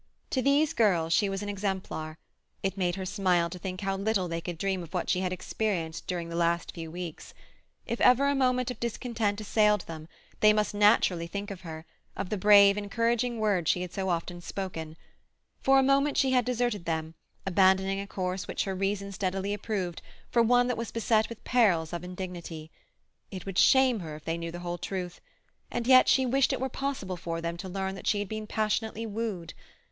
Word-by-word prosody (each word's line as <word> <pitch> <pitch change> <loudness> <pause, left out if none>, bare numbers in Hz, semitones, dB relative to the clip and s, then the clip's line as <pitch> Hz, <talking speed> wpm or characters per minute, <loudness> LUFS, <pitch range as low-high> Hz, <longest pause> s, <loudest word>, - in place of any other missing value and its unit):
To 260 - +1
these 285 +3 +3
girls 170 -7 +2
she 205 +2 +3
was 195 +1 -3
an - - -5
exemplar; 190 -6 -3 0.5
it 195 -1 -1
made 180 -3 0
her 190 -1 -4
smile 180 -4 +1
to 180 - -7
think 185 +1 -5
how 195 -1 -1
little 195 -1 0
they 165 0 -3
could 175 -1 -5
dream 190 +1 -1
of 170 +2 -9
what 180 - 0
she 180 - +1
had 185 -1 -1
experienced 180 -3 -3
during 175 -2 -3
the 170 - -6
last 170 0 +1
few 165 -2 -7
weeks; 170 -1 -7 0.5
if 235 - -3
ever 255 +3 +5
a 280 - +3
moment 255 -2 +1
of - - -8
discontent 230 -3 -2
assailed 210 -1 +3
them, 160 -2 -9 0.3
they 215 0 +6
must 210 0 0
naturally 205 -5 +3
think 200 +3 -5
of 190 -2 -8
her, 160 -2 -8 0.3
of 195 -1 -3
the 210 - 0
brave, 200 0 +7
encouraging 230 +3 0
words 200 -7 +1
she 180 - +2
had 180 - -7
so 190 -1 -2
often 175 0 -2
spoken. 165 -4 -5 0.6
For 270 0 +5
a 270 - +5
moment 275 +2 +2
she 265 -1 +3
had 250 -2 +3
deserted 240 -6 -1
them, 160 -1 -2 0.3
abandoning 190 +1 +3
a 200 - -5
course 185 -1 -3
which - - -1
her 195 - -3
reason 200 +1 -2
steadily 195 +1 -2
approved 200 -5 -3 0.3
for 235 - +4
one 245 +2 +4
that 250 -1 -1
was 230 0 -3
beset 225 -1 +1
with 230 - -10
perils 180 -10 +2
of 170 0 -4
indignity. 180 -3 -7 0.6
It 185 -3 -7
would 195 -2 -1
shame 260 -4 +5
her 160 -4 -6
if 150 - -12
they 165 +1 -2
knew 170 0 -4
the 175 +1 -7
whole 175 0 -4
truth—and 185 +6 -7
yet 255 0 +7
she 265 - +4
wished 265 +2 +2
it - - -1
were 265 +1 -1
possible 255 -9 -3
for 165 0 -4
them 170 0 -3
to 190 +1 -7
learn 190 +1 -3
that 195 - -8
she 210 - +3
had 205 -1 -2
been 215 0 -5
passionately 220 +1 -1
wooed. 210 -6 -4
195 Hz, 205 wpm, -28 LUFS, 175-220 Hz, 0.6 s, brave